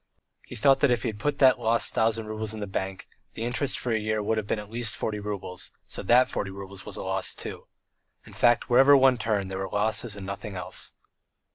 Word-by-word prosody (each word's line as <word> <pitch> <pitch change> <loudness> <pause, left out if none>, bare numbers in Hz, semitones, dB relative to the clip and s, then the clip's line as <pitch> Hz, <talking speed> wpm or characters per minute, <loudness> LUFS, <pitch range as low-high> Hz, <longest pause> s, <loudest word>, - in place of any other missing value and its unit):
He - - -8
thought 135 +4 +4
that 140 - +4
if 120 -2 +1
he 120 - 0
had 105 -2 -7
put 145 +5 -1
that 130 -2 +5
lost 115 +1 +1
thousand 110 0 +1
roubles 110 0 -4
in - - -7
the 105 - -3
bank, 95 -1 -4 0.3
the 115 - -4
interest 125 +3 0
for 125 - -2
a 110 - +2
year 110 0 -1
would 110 +1 +1
have 105 - -6
been - - 0
at 105 0 -8
least 120 -1 -2
forty 105 -1 -3
roubles, 100 -3 -5 0.2
so - - -6
that 125 +5 +5
forty 100 - -3
roubles 95 0 -8
was - - -6
a - - -5
loss - - -2
too. - - -8 0.6
In - - -14
fact, 120 -1 +3
wherever 135 +3 +7
one 130 -2 +4
turned 105 -4 -1
there 95 - -4
were 95 0 -3
losses 105 +2 -1
and 100 -2 -8
nothing 100 +1 -6
else. 90 - -6
110 Hz, 235 wpm, -27 LUFS, 100-120 Hz, 0.6 s, wherever